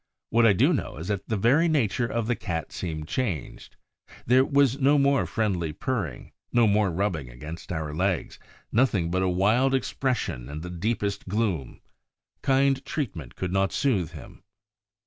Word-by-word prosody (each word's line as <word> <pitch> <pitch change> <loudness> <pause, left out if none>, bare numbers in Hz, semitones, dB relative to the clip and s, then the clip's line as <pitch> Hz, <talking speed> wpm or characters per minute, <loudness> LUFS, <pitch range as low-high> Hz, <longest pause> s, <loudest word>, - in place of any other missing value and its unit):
What 115 0 +5
I 105 - +6
do 90 - +3
know - - -3
is 80 +5 -6
that 100 -2 -3
the 110 - 0
very 135 - +4
nature 125 -6 +1
of 115 -1 -2
the 120 +1 0
Cat 80 -6 -4
seemed 80 -3 -5
changed: 100 - -4 0.5
there 130 +2 +5
was 140 -1 +2
no 140 +2 +4
more 140 -1 +3
friendly 95 -9 -1
purring, 100 - -3 0.2
no 120 -1 +4
more 105 -1 +3
rubbing 85 -7 -2
against 75 +10 -9
our 80 -3 -3
legs; 90 +2 -1 0.3
nothing 105 -9 +2
but 95 +1 +1
a 95 - +2
wild 110 +9 +3
expression 125 - -2
and 75 +2 -6
the 90 - -6
deepest 100 +3 -2
gloom. 95 - -2 0.6
Kind 135 0 +2
treatment 95 - -4
could 90 -1 -3
not 95 0 +2
soothe 105 - 0
him. - - -11
100 Hz, 165 wpm, -26 LUFS, 85-130 Hz, 0.6 s, I